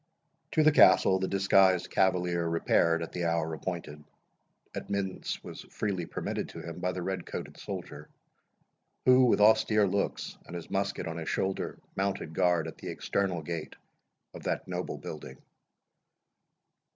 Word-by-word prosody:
To 155 - +4
the 155 - +6
Castle 95 -6 +6
the 95 - -1
disguised 95 -2 +3
cavalier 90 -2 +2
repaired 85 0 +2
at 80 - -7
the 90 -1 -2
hour 80 -1 0
appointed. 80 -3 -5 0.7
Admittance 100 -2 -3
was - - -8
freely 95 -5 -2
permitted - - -3
to - - -9
him 85 +1 -7
by 90 +1 0
the 90 -1 -4
red 95 +1 -3
coated - - -7
soldier, 75 +1 -7 1.0
who, 130 0 +7
with 120 - +3
austere 105 0 +5
looks, 100 +1 -2
and 90 - -8
his 85 - -7
musket 100 0 -1
on 80 0 -4
his 80 -1 -4
shoulder, 95 0 -2 0.2
mounted 95 -5 -2
guard 85 -1 +2
at 80 - -9
the - - -6
external 95 -5 -1
gate 80 0 -5 0.6
of - - -9
that - - -2
noble - - -4
building. - - -8
90 Hz, 150 wpm, -30 LUFS, 85-100 Hz, 1.0 s, who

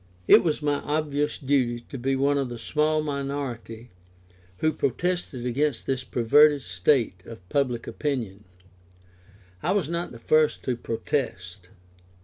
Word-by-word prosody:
It - - +8
was 155 -3 -1
my 145 -1 +1
obvious 150 -1 -1
duty 130 -4 0
to 135 - -6
be 135 +2 0
one 140 +1 +2
of 135 -2 -2
the 120 - -6
small 155 +5 0
minority 135 -5 -5 0.7
who 155 +7 +1
protested 155 -3 -2
against 135 +1 0
this 130 -1 -1
perverted 145 +4 +4
state 90 +2 +1
of 95 -6 -11
public 130 -5 0
opinion. 115 -9 -3 1.2
I 180 - +1
was 195 -8 0
not 170 +1 -3
the 120 - -9
first 155 +6 +2
to 125 - -1
protest. 100 -7 -4
135 Hz, 135 wpm, -26 LUFS, 120-150 Hz, 1.2 s, It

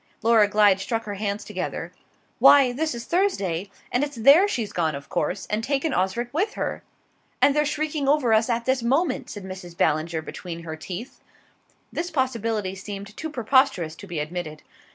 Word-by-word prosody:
Laura 225 -2 +5
Glyde 205 -2 +4
struck 225 +3 -2
her 205 - -5
hands 200 0 -3
together. - - -5 0.5
"Why, 275 -3 +7
this 310 +3 -2
is 235 - -7
Thursday, 200 - 0 0.2
and 250 - +1
it's 290 0 -4
there 280 - +6
she's 230 - -3
gone, 160 -4 0
of 140 - -9
course; 180 +6 -2
and 215 +1 -2
taken 280 +3 0
Osric 235 +6 -1
with 395 +8 0
her!" - - -3 0.6
"And 280 +2 +4
they're 300 0 +3
shrieking 300 -1 -2
over 275 -5 +3
us 220 +2 +3
at 235 0 0
this 260 -1 +1
moment," 270 +5 0
said 205 - -7
Mrs. 185 -2 -9
Ballinger 160 +1 +1
between 170 0 -7
her 160 -1 -5
teeth. 185 +9 -8 0.7
This 345 +1 -2
possibility 230 - -1
seemed 200 +1 -8
too 320 - -5
preposterous 240 - +2
to 200 - -11
be 175 -3 -5
admitted. 155 0 -5
225 Hz, 175 wpm, -24 LUFS, 185-275 Hz, 0.7 s, Why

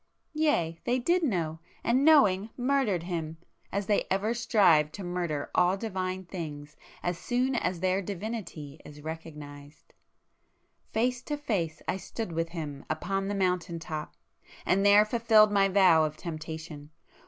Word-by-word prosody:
Yea, 295 - +1
they 245 +1 +1
did 345 +9 +2
know!—and 180 - -1
knowing, 220 -10 +5
murdered 245 -9 +1
Him,—as 170 +3 -5
they 205 +1 +1
ever 200 +4 +1
strive 195 -10 +4
to 200 - -7
murder 175 -5 -3
all 180 +2 +3
divine 185 -3 -3
things 150 -5 -7 0.3
as 175 -1 -2
soon 250 +7 0
as 180 -7 -1
their 185 +1 +1
divinity 190 -7 -6
is 150 0 -12
recognised. 150 -2 -9 1.0
Face 245 +2 0
to 295 +2 -4
face 185 - -2
I - - 0
stood 220 0 -6
with 165 0 -2
Him 150 -5 -6
upon 195 +5 -2
the 205 - -2
mountain 180 -3 0
top, 155 -2 -6 0.5
and 195 +1 +2
there 205 +1 +7
fulfilled 220 -2 +4
my 200 -1 +4
vow 185 -5 +5
of 155 0 -2
temptation. 155 -2 -7
185 Hz, 140 wpm, -29 LUFS, 160-215 Hz, 1.0 s, there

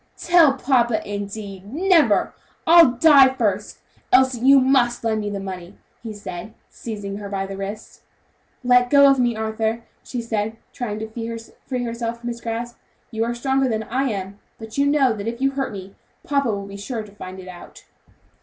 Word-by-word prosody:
"Tell 335 -5 +5
papa, 245 -4 +1
indeed; 200 -1 -6
never! 320 - +3 0.3
I'd 325 -8 +6
die 275 -4 +7
first! 210 -5 -2 0.3
Elsie, 260 -1 +4
you 270 +3 +6
must 255 -3 +2
lend 220 -1 0
me 210 - -3
the 200 -1 -4
money," 185 -1 -8 0.2
he 225 - -7
said, 205 0 -8 0.2
seizing 205 -3 -6
her 205 -1 -7
by 195 -1 -2
the 195 0 -7
wrist. 200 +3 -7 0.6
"Let 245 0 +4
go 280 0 +7
of 275 -1 +4
me, 240 -2 +1
Arthur," 220 +1 -2 0.2
she 245 - -5
said, 220 -1 -3 0.2
trying 215 -4 -4
to 225 +1 -5 0.3
free 255 -2 -2
herself 235 0 -4
from 240 0 -5
his 235 0 -6
grasp. 235 +1 -5 0.3
"You 225 -1 -1
are 235 +1 -2
stronger 265 +2 0
than 220 -1 -1
I 260 +5 -1
am, 200 -1 -5 0.2
but 220 -1 -10
you 280 0 +2
know 280 -4 +3
if 225 +3 -5
you 270 +1 +1
hurt 270 0 -3
me, 195 -1 -9 0.3
papa 280 -3 +1
will 200 -2 -3
be 200 0 -9
sure 220 +2 -5
to 210 - -14
find 190 -2 -9
it 185 - -11
out." 180 -1 -12
230 Hz, 180 wpm, -22 LUFS, 205-260 Hz, 0.6 s, die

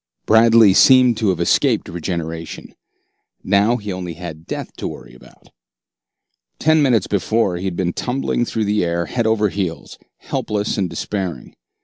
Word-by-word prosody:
Bradley 110 -2 +5
seemed 125 0 +5
to 110 -3 0
have 90 -3 -1
escaped 85 - +1
regeneration. 85 -1 -6 0.7
Now 100 +5 +2
he 105 -3 -6
had - - -4
only 90 -2 -6 0.3
death - - -6
to - - -4
worry - - -10
about. 65 - -19 1.1
Ten 155 0 +3
minutes 120 -8 +2
before, 100 0 0
he 90 - -6
had 95 -2 -3
been 90 -1 -1
tumbling 125 -1 -2
through 110 -2 -2
the 105 -1 +1
air 85 0 -1
head 120 +3 -2
over 105 -2 +2
heels, 90 -4 -5 0.2
helpless 105 0 -3
and 95 -4 -1
despairing. 90 +1 -5
100 Hz, 150 wpm, -19 LUFS, 85-115 Hz, 1.1 s, Bradley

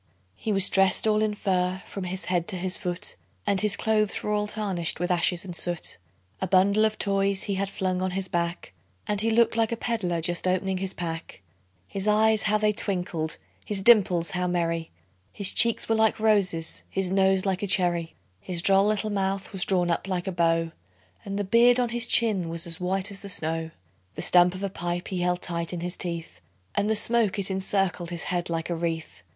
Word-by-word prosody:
He 220 - -4
was 195 -1 +7
dressed 195 +1 +3
all 215 -1 +2
in 215 -1 0
fur 185 -2 -1
from 195 -2 -6
his 185 +1 -4
head 175 -2 -1
to 205 - -2
his 185 0 -1
foot, 180 0 -3 0.3
And 200 -2 +2
his 210 -1 +2
clothes 215 -2 0
were 210 - -2
all 210 0 0
tarnished 195 -7 -2
with 180 +1 -1
ashes 175 +1 +2
and 180 -2 -6
soot; 175 - 0 0.4
A 190 - -1
bundle 200 +4 +4
of 215 0 -1
toys 195 -1 0
he 200 - -2
had 195 0 -2
flung 185 -2 -2
on 185 - 0
his 195 -1 -2
back, 170 - -3 0.3
And 205 -1 0
he 225 - +1
looked 225 0 +3
like 225 -1 +1
a 230 - -2
peddler 205 -8 -1
just 175 +2 0
opening 185 +1 0
his 190 0 -4
pack; 165 - -5 0.4
His 195 - -4
eyes 215 +1 +3
how 215 0 +2
they 215 0 +2
twinkled! 180 -6 -2 0.3
his 200 -2 -4
dimples 185 -7 +4
how 180 -1 -1
merry! 165 -2 -1 0.4
His 200 - +3
cheeks 230 -1 +3
were 225 - +2
like 220 -1 +2
roses, 195 -7 +1
his 190 -1 -2
nose 190 0 +2
like 190 -1 -1
a 205 - -2
cherry; 175 -3 0 0.2
His 175 - -1
droll 195 +1 +4
little 215 0 -1
mouth 195 -1 -2
was 190 -2 +1
drawn 180 -2 +1
up 170 - -2
like 180 -2 -2
a 190 - -2
bow, 165 -1 +1 0.5
And 200 0 -5
the 205 - -1
beard 235 +5 +4
on 245 -1 +1
his 240 +1 -1
chin 205 -8 +2
was 165 0 -1
as 170 +1 -2
white 190 +2 0
as 200 - -5
the 200 - -9
snow; 160 -2 -2 0.5
The - - -4
stump 180 0 +4
of 190 - -7
a 200 - -1
pipe 175 0 -4
he 185 - -3
held 180 0 -1
tight 170 -1 -3
in 175 -2 -5
his 175 0 -3
teeth, 165 - -5 0.3
And 205 - 0
the 220 - +2
smoke, 215 -1 +1
it 195 -1 0
encircled 190 -2 0
his 170 -1 -5
head 175 -1 -2
like 165 +1 -3
a - - 0
wreath. 165 - -4
190 Hz, 215 wpm, -26 LUFS, 175-205 Hz, 0.5 s, was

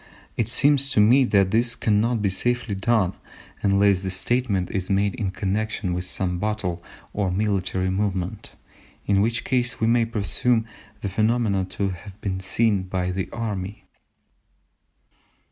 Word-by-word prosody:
It 115 -1 -1
seems 140 +2 +4
to - - +3
me 125 +6 +6
that 100 -5 +3
this 120 +2 +2
cannot 110 +1 +1
be 100 - +2
safely 120 +2 -1
done 100 -1 +1 0.5
unless 100 -1 +3
the 95 - -3
statement 95 0 -1
is 95 -2 -3
made 100 0 +2
in 110 -6 -2
connection 100 0 -2
with 90 +1 -3
some 90 -1 -2
battle 100 -5 -2 0.3
or 100 -2 0
military 95 -1 0
movement, 95 -2 -3 0.5
in 100 -1 +3
which 115 +2 0
case 125 -2 0
we 110 - +1
may 115 0 +3
presume 115 +1 0 0.4
the 100 - -2
phenomena 110 -1 +1
to 100 +1 -2
have 95 +2 -9
been 95 -3 -3
seen 100 +2 +1
by 95 -1 -2
the 95 +1 -3
army." 105 -4 -5
100 Hz, 145 wpm, -24 LUFS, 95-115 Hz, 0.5 s, me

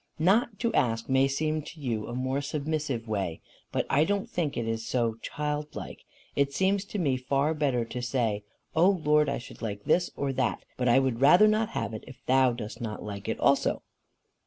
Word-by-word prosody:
"Not 200 +6 +2
to 235 -2 +1
ask 115 -1 +1
may 135 +1 +4
seem 155 +3 -1
to 155 +2 -11
you 115 -6 -2
a 120 - -5
more 130 +2 -1
submissive 145 -4 -2
way, 95 -6 -2 0.3
but - - 0
I 145 +2 +3
don't 200 +3 0
think 160 -5 -2
it 115 -1 -2
is 115 0 -2
so 115 -2 0
childlike. 150 0 -4 0.3
It 140 0 +2
seems 190 +5 +1
to 205 - -5
me 140 -8 +1
far 140 +4 +1
better 135 -6 0
to 125 +2 -5
say, 115 -4 0 0.3
'O 170 +4 +6
Lord, 150 -5 +3
I 140 - -1
should 120 - -11
like 105 -3 -4
this 175 0 +2
or 140 -1 -1
that, 130 0 -1
but 125 -1 +1
I 120 - +6
would 130 -3 +1
rather 175 +10 +7
not 215 +1 +2
have - - -2
it 110 - -6
if 130 - -11
thou 130 -1 +4
dost 120 +1 -7
not 110 -2 -4
like 100 -2 -6
it - - -2
also. - - +2
135 Hz, 205 wpm, -28 LUFS, 120-155 Hz, 0.3 s, rather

